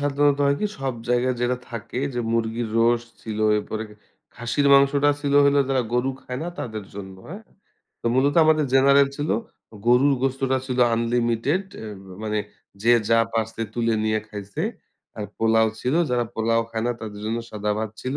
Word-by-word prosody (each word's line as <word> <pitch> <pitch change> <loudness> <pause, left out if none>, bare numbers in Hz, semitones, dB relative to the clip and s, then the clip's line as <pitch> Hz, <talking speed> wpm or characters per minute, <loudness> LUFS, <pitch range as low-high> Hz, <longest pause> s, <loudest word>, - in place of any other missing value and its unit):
সাধারণত 145 0 +2
হয় 140 0 +2
কি? 210 - +1
সব 135 -2 -2
জায়গায় 125 +1 +2
যেটা 125 +1 +1
থাকে 115 +1 -5 0.2
যে, 120 - -1
মুরগির 115 0 -1
রোস্ট 120 0 +2
ছিল, 110 -1 -5 0.2
এরপরে 110 +1 -3 0.5
খাসির 120 +4 -1
মাংসটা 140 +1 +4
ছিল 145 -1 -1
হইলো 140 0 +4
যারা 130 -2 +2
গরু 125 +2 +1
খায় 125 0 -5
না 170 - -3
তাদের 110 -4 -5
জন্য, 95 -1 -8
হ্যাঁ? 200 +6 -8 0.6
তো - - -5
মূলত 140 +3 +3
আমাদের 155 -1 +4
জেনারেল 140 +1 +5
ছিল। 145 +1 -2 0.6
গরুর 130 +4 +5
গোস্তটা 135 0 +1
ছিল 130 -1 -3 0.2
আনলিমিটেড 120 - 0 0.2
অ্যা 110 - -7 0.3
মানে 105 -1 -1 0.4
যে 120 +2 +5 0.2
যা 115 - +5
পারছে 115 0 -2
তুলে 115 -1 +1
নিয়ে 110 0 +1
খাইছে, 100 -2 -6 0.6
আর 105 - -3
পোলাও 110 0 +3
ছিল। 125 +3 0 0.2
যারা 120 -1 +1
পোলাও 115 +1 +1
খায় 115 0 -2
না 120 - +1
তাদের 105 -2 -7
জন্য 115 +1 -1
সাদা 105 0 -2
ভাত 110 -1 -3
ছিল। 130 +2 -2
120 Hz, 170 wpm, -23 LUFS, 110-135 Hz, 0.6 s, জেনারেল